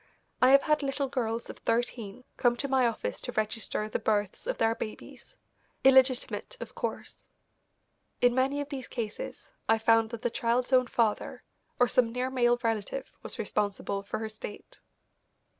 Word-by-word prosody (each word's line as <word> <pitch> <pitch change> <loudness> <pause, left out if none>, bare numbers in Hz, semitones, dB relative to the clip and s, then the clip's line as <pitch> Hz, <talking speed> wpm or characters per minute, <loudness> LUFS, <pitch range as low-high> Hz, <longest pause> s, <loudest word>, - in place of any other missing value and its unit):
I 255 - +7
have 275 +1 +7
had 300 -1 +2
little 275 0 -1
girls 235 -3 -2
of - - -9
thirteen 230 -1 -2
come 240 -1 +3
to 280 - -2
my 260 -2 +3
office 230 - -3
to - - -5
register 215 -1 -1
the 215 - -2
births 210 - -1
of - - -1
their 225 0 +3
babies, 215 -1 -8 0.5
illegitimate, 265 - +3
of - - -7
course. - - -5 0.9
In 245 0 +4
many 270 +3 +1
of 285 - -6
these 270 -3 -5
cases 230 - -6 0.2
I 225 - +6
found 225 0 +4
that 235 -1 -7
the 240 - +1
child's 240 +3 0
own 255 -1 +5
father 225 -3 0 0.4
or 245 - +5
some 240 -1 +2
near 250 +2 -2
male 240 -2 +3
relative 225 +4 -2
was - - -6
responsible 200 -1 -1
for 200 - -4
her 220 0 -4
state. 215 -1 -10
240 Hz, 165 wpm, -29 LUFS, 220-260 Hz, 0.9 s, I